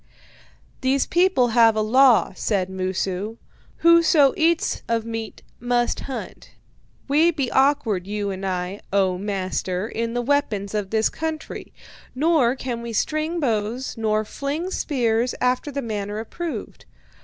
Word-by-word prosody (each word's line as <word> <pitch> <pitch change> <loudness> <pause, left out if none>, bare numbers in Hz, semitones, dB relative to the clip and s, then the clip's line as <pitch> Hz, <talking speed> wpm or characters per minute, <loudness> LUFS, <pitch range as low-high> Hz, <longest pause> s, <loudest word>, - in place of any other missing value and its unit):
"'These 260 +1 +2
people 345 -8 +3
have 225 -1 +5
a 215 - +1
law,' 245 0 +4
said 190 -3 -1
Mosu: 190 +3 -3 0.5
'whoso 330 -4 +6
eats 330 +1 +1
of 230 -1 0
meat 225 -1 -6 0.2
must 245 0 0
hunt. 265 - -8 0.5
We 305 +5 +4
be 285 -7 -2
awkward, 240 -9 +2
you 205 -1 -2
and 190 0 -6
I, 185 +1 -3
O 190 -2 +1
master, 190 -1 -2
in 230 0 -3
the 245 - 0
weapons 230 -8 0
of 205 -2 -2
this 220 +1 +2
country; 315 -1 -5 0.4
nor 280 -4 +3
can 250 -3 -4
we 235 -1 -6
string 310 - -1
bows 235 -1 -1
nor 215 -1 0
fling 295 - -4
spears 240 -6 0
after 250 +3 0
the 280 0 -3
manner 205 -2 -4
approved. 320 +9 -6
235 Hz, 135 wpm, -23 LUFS, 210-280 Hz, 0.5 s, whoso